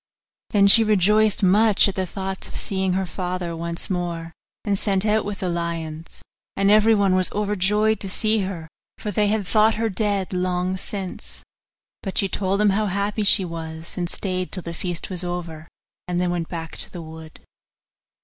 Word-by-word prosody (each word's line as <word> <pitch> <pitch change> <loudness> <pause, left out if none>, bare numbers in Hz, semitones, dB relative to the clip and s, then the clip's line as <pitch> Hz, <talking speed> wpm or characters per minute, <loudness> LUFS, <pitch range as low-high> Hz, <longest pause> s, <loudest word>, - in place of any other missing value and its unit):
Then 200 -3 +4
she 225 +3 +8
rejoiced 210 +1 +3
much 205 +3 +5
at 200 - -2
the 185 -1 -2
thoughts 190 +1 -5
of - - -10
seeing 190 -2 -1
her 190 +1 0
father 180 -1 -4
once 170 0 -4
more, 170 -3 -3 0.3
and 205 -2 +1
set 195 0 +1
out 215 0 +2
with 205 -1 -5
the 185 - -1
lions; 165 -2 -4 0.3
and 195 +1 +3
everyone 210 -2 +4
was 185 0 +1
overjoyed 210 +1 +1
to 195 - -4
see 215 +3 +2
her, 185 -5 -4 0.3
for 210 - -4
they 210 +1 +1
had 210 -1 0
thought 215 +3 +3
her 225 0 -1
dead 200 -1 -1
long 180 0 -1
since. 190 0 -5 0.6
But 195 - -5
she 200 - +3
told 195 +1 -1
them 210 -1 +4
how 210 +2 0
happy 200 +2 -1
she 195 -1 +4
was, 160 -1 -7
and 175 -2 -2
stayed 185 -1 -3
till 185 - -4
the 170 - -6
feast 175 +2 -4
was 180 -1 -2
over, 170 -2 -5 0.4
and 175 0 -1
then 180 -1 0
went 170 -2 -3
back 165 -2 -6
to - - -1
the 175 -2 -7
wood. 160 0 -11
190 Hz, 185 wpm, -23 LUFS, 175-205 Hz, 0.6 s, she